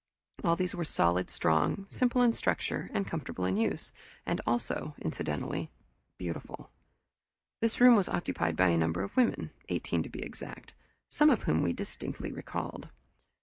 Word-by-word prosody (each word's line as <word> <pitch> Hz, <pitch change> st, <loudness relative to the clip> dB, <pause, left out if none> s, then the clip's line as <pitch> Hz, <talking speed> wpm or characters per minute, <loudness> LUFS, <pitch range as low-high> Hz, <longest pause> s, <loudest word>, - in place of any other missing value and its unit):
All 170 Hz, -3 st, +4 dB
these 180 Hz, +1 st, -1 dB
were 175 Hz, -3 st, -2 dB
solid, 90 Hz, -, +2 dB
strong, 80 Hz, -, +1 dB
simple 250 Hz, +3 st, +2 dB
in 235 Hz, -1 st, +5 dB
structure, -, -, -1 dB
and 200 Hz, -, 0 dB
comfortable 150 Hz, -, -3 dB
in 95 Hz, +1 st, +1 dB
use 110 Hz, -, -1 dB, 0.6 s
also, 120 Hz, +5 st, -1 dB
incidentally, 80 Hz, -, -3 dB, 0.5 s
beautiful. 85 Hz, -2 st, -6 dB, 0.9 s
This 230 Hz, 0 st, 0 dB
room 245 Hz, -1 st, +9 dB
was 200 Hz, -4 st, +3 dB
occupied 85 Hz, -, -1 dB
by 90 Hz, +2 st, +4 dB
a 85 Hz, -, +3 dB
number 80 Hz, +3 st, +1 dB
of 100 Hz, -, -6 dB
women, 250 Hz, -2 st, +2 dB, 0.2 s
eighteen -, -, 0 dB
to -, -, -5 dB
be -, -, -6 dB
exact, -, -, -9 dB, 0.3 s
some 300 Hz, 0 st, +5 dB
of 245 Hz, -8 st, +3 dB
whom 80 Hz, -, +2 dB
we 85 Hz, -, +2 dB
distinctly -, -, -5 dB
recalled. -, -, -5 dB
150 Hz, 150 wpm, -31 LUFS, -, 0.9 s, room